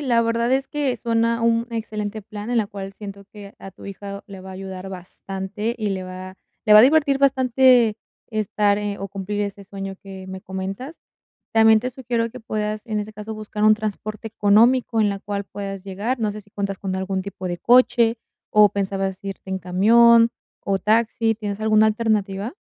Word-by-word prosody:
la 240 -5 +2
verdad 230 +1 0
es 270 +1 +1
que 285 -4 -1
suena 230 0 0
un 230 0 +2
excelente 215 -2 -4
plan, 210 +1 -8
en 245 - 0
la 215 -3 +2
cual 195 -2 -8
siento 200 -1 -9
que 205 -1 -11
a 195 - -9
tu - - -15
hijo 200 0 -7
le 195 -2 -10
va 190 - -11
a - - -8
ayudar 190 0 -7
bastante 195 +4 -5
y 215 -2 -2
le 190 -2 -3
va 185 +1 -8 0.3
le 215 - +4
va 210 - +10
a - - +9
divertir 280 0 +4
bastante 255 -4 +4 0.3
estar 210 -1 +1
e 205 -1 -3
o 195 0 -5
cumplir 200 +2 -3
ese 200 0 -5
sueño 195 0 -7
que 190 -1 -9
me 190 0 -7
comentas. 195 - -6 0.6
También 220 -1 +6
te 250 +3 -3
sugiero 235 -2 -2
que 250 0 -11
puedas, 215 0 -3
en 215 -2 -2
ese 215 +1 -6
caso, 215 +1 -7
buscar 215 0 -5
un 215 0 +7
transporte 215 +1 -5
económico 225 +3 +3
en 210 - +4
la 200 -1 -2
cual 200 0 -4
puedas 195 -2 -6
llegar, 210 +7 -3
no 215 -2 -1
sé 215 - -8
si 205 - -26
cuentas 200 -1 -3
con 190 -1 -4
algún 190 0 -2
tipo 190 -1 -6
de 175 0 -3
coche 240 -1 +4 0.3
o 210 -1 +6
pensabas 195 -1 -2
irte 195 -1 -7
en 190 0 -2
camión, 230 +6 +5 0.3
o 195 -1 -1
taxi, 225 +1 +1
¿tienes 210 -1 -5
alguna 215 0 +4
alternativa? 215 - 0
210 Hz, 195 wpm, -22 LUFS, 195-230 Hz, 0.6 s, va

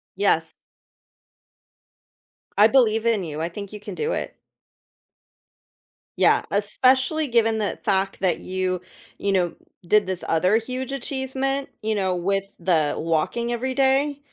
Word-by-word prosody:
Yes. - - +1 2.1
I 210 +2 +8
believe 225 -3 +3
in 215 -6 +1
you. 155 0 -5
I 170 - -1
think 200 +3 -8
you 210 - -7
can - - -7
do 455 +2 -2
it. - - -4 1.8
Yeah. - - +4
Especially 260 +9 +2
given 225 -2 +2
the 205 - -2
fact 195 0 0
that 185 -2 +1
you, 185 -1 -2 0.4
you 200 - 0
know, 180 -3 +1 0.3
did 210 -1 +4
this 185 -2 -1
other 180 +7 +3
huge 255 +3 -4
achievement, 270 +1 -2
you 220 0 0
know, 190 -3 0
with 195 +2 0 0.2
the 165 -4 +1
walking 165 +9 -1
every 255 +2 -2
day. 275 +1 +2
215 Hz, 135 wpm, -23 LUFS, 185-260 Hz, 2.1 s, I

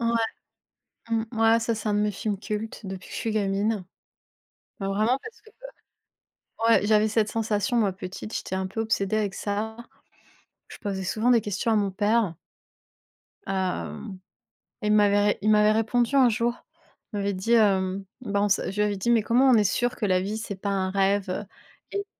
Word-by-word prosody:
Ouais, 235 - 0 1.0
mmh 225 -1 +1
ouais, 225 0 +4
ça, 230 0 -1
c'est 215 0 -4
un 210 - +1
de - - +2
mes 210 0 +1
films 200 0 -3
cultes 215 0 -5
depuis 190 -1 -7
que - - -12
je - - -4
suis 225 - -2
gamine. 205 0 0 1.0
Bah, 195 - -3
vraiment 215 +6 +1
parce 455 +1 -11
que, 440 - -18 0.9
heu 225 0 -3
ouais, 205 - -2
j'avais 215 0 +4
cette 215 0 +1
sensation, 220 0 -1
moi, 210 -4 +2
petite. 185 +3 -7
J'étais 190 - -3
un 190 0 -2
peu 225 +4 -4
obsédée 215 -2 0
avec 205 -3 -1
ça. 215 +2 -3 0.9
Je - - -11
posais 195 -2 -4
souvent 220 +6 +1
des 235 -2 +5
questions 205 +3 -1
à - - +3
mon 200 -2 +1
père. 205 -2 +1 1.1
Hem, 190 +1 -3 0.6
il 210 -1 +1
m'avait 205 -1 +4
ré 205 - +2
il 215 - +1
m'avait 210 0 +5
répondu 230 +4 +1
un 260 -3 +6
jour. 235 +1 0 0.6
Il - - -2
m'avait 200 0 -1
dit: 190 +6 0
«Hem, 195 -3 +2 0.2
bah 200 -4 -1
on 205 - +3
s», 200 - +2
je 195 - -7
lui - - +2
avais 205 -1 0
dit: 195 - -2
«Mais 230 - +4
comment 250 +5 +4
on 250 - +6
est 210 - +4
sûr 245 +5 0
que 215 - -2
la 185 -2 +3
vie, 205 +3 -3
c'est 220 -3 -5
pas 200 +2 -4
un 190 -1 0
rêve?», 195 0 +1
heu, 185 - -2 0.5
et 400 0 -3
210 Hz, 200 wpm, -26 LUFS, 195-225 Hz, 1.1 s, un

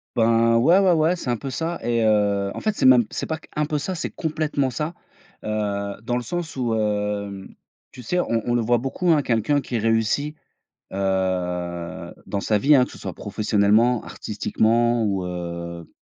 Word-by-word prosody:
Ben, 115 0 +4
ouais, 165 +10 +5
ouais, 190 -2 +4
ouais. 165 +1 +3
C'est 170 - -5
un 120 - +1
peu 135 - -6
ça 165 +6 -3
et 115 0 0
heu, 100 -2 +2
en - - -5
fait 215 -1 -1
c'est - - 0
même 125 -3 +7
c'est - - -3
pas 160 - -2
qu - - -19
un 150 0 +1
peu 150 0 -1
ça, 145 +6 -3
c'est 170 - -3
complètement 155 -4 -1
ça, 150 +7 -3 0.5
heu, 100 -2 -2
dans 120 +1 -1
le - - -2
sens 175 -2 -4
où, 120 -3 0
hem, 105 -2 -2 0.5
tu 125 - -10
sais? 180 +10 0
On 115 -9 0
on 120 - 0
le 120 - +2
voit 120 +2 +2
beaucoup, 135 +8 -2
hein, 150 - +4
quelqu'un 135 +4 +1
qui 125 -2 -3
réussit, 115 +7 +1 0.6
heu, 90 -3 -2
dans 100 - -3
sa 105 - +2
vie, 140 +8 +4
hein, 125 -2 +5
que - - -13
ce - - -11
soit - - -6
professionnellement, 110 +3 +2
artistiquement 115 +2 0
ou 95 -3 -1
heu, 85 -1 -6
115 Hz, 195 wpm, -23 LUFS, 100-140 Hz, 0.6 s, même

